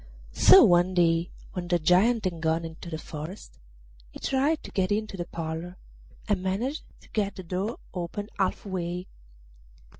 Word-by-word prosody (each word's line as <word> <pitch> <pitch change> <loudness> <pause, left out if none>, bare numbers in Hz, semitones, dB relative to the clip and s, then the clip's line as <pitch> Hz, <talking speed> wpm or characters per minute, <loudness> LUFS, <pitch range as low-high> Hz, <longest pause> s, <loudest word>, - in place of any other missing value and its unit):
So - - +8
one 175 +1 +4
day, 170 -1 +3 0.2
when 180 -1 -4
the 175 0 +3
Giant 195 +8 +3
had 170 -3 -2
gone 160 +1 +1
into 165 +1 -8
the 160 - -4
forest, 155 +5 -8 0.5
he - - -11
tried 280 +4 +1
to - - -9
get 190 -1 0
into 215 0 -1
the 175 -2 -4
parlour, 165 +2 -5 0.5
and - - +1
managed 225 +11 -2 0.2
to - - -20
get 200 -2 -1
the 185 - -7
door 190 +6 -3 0.2
open 180 +3 -4
half 190 - 0
way. 180 -2 -3
180 Hz, 160 wpm, -27 LUFS, 170-200 Hz, 0.5 s, So